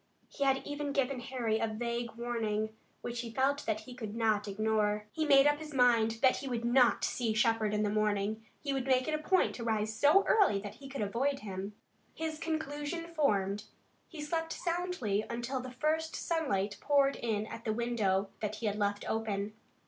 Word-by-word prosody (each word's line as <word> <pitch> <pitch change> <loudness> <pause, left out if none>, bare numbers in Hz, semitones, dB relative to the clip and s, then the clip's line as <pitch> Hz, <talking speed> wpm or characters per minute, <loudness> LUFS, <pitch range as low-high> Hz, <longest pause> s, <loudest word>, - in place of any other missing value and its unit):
He 280 - -3
had 270 -1 +2
even 290 -1 -3
given 275 -2 0
Harry 235 -3 -1
a 225 - +1
vague 235 +1 -3
warning, 220 -2 -2 0.3
which 240 0 -4
he 235 - -6
felt 270 +4 +1
that 215 -1 0
he 245 +3 -10
could 220 -4 -6
not 215 -2 +1
ignore. 210 0 0
He 315 +4 -1
made 275 -1 +7
up 290 0 +3
his 305 -2 -8
mind 230 -3 +4
that 260 - +5
he 275 - -5
would 240 -2 -2
not 245 0 +4
see 230 -3 0
Shepard 220 -1 +2
in 210 0 +1
the 210 - +1
morning. 215 0 0 0.2
He 280 -2 -1
would 270 -1 -2
make 255 -1 +3
it 310 - 0
a 305 - 0
point 370 +4 +2
to 235 - -6
rise 220 -1 0
so 295 - +5
early 390 - +4
that 205 0 -7
he 275 - -9
could 275 -3 -4
avoid 265 +7 0
him. 195 0 -5 0.4
His 320 -1 -3
conclusion 315 +1 -3
formed, 210 - +1 0.4
he 320 -3 -8
slept 325 +1 -2
soundly 340 - -1
until 240 +3 -2
the 255 0 -6
first 310 +5 -1
sunlight 210 - -1
poured 280 -1 +3
in 215 -3 -1
at 230 +1 -8
the 220 - 0
window 215 -4 0
that 210 0 -2
he 225 - -5
had 210 -1 0
left 205 -1 -1
open. 215 -2 -2
235 Hz, 195 wpm, -32 LUFS, 215-280 Hz, 0.4 s, made